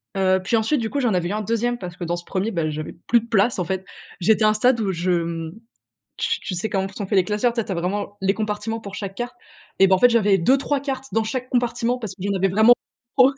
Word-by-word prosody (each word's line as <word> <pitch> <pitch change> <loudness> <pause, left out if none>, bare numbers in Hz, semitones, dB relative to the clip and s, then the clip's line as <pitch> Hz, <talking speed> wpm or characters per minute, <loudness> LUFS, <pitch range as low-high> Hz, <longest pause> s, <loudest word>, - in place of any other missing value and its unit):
Heu, 190 -1 +3
puis 230 - +1
ensuite 225 +6 +2
du 220 -1 -2
coup, 285 - -1
j'en 235 -5 +1
avais 175 -1 0
eu - - -3
un 215 - -1
2e 230 +3 -1
parce 180 0 -7
que 175 - -6
dans 170 +1 -1
ce 175 - -7
1er, 200 +4 -2
ben, 165 -4 -1
j'avais 155 0 -5
plus 235 - +5
de - - -11
place, 225 +1 +2
en 180 - 0
fait. 190 +1 -3 0.4
J'étais 215 +4 +4
à - - +6
un - - +3
stade 240 +2 +3
où 200 -3 0
je, 175 +2 -2
hem, 165 -1 -2 0.7
tu - - 0
tu 185 - -4
sais 190 +5 -1
comment 190 -1 -1
sont 200 0 -6
fait 200 - 0
les 185 - +5
classeurs? 210 +4 +1
Tu 230 - 0
sais, - - -3
tu 195 - -4
as - - -1
vraiment 200 +4 -3
les 195 +1 +2
compartiments 215 +1 -3
pour 200 -1 -9
chaque 195 -2 -5
carte 245 +4 -4 0.4
et 195 - +7
bah, 190 - +5
en - - +2
fait, 245 +3 +6
j'avais 205 -4 +4
2-3 275 +9 +2
cartes 270 -1 -4
dans 225 0 +1
chaque 255 +2 -3
compartiment 240 0 0
parce 215 -5 -6
que 185 - -11
j'en 200 0 -1
avais 195 +1 +2
vraiment 220 +5 +6 0.4
trop. 265 +1 +6
210 Hz, 285 wpm, -22 LUFS, 190-235 Hz, 0.7 s, et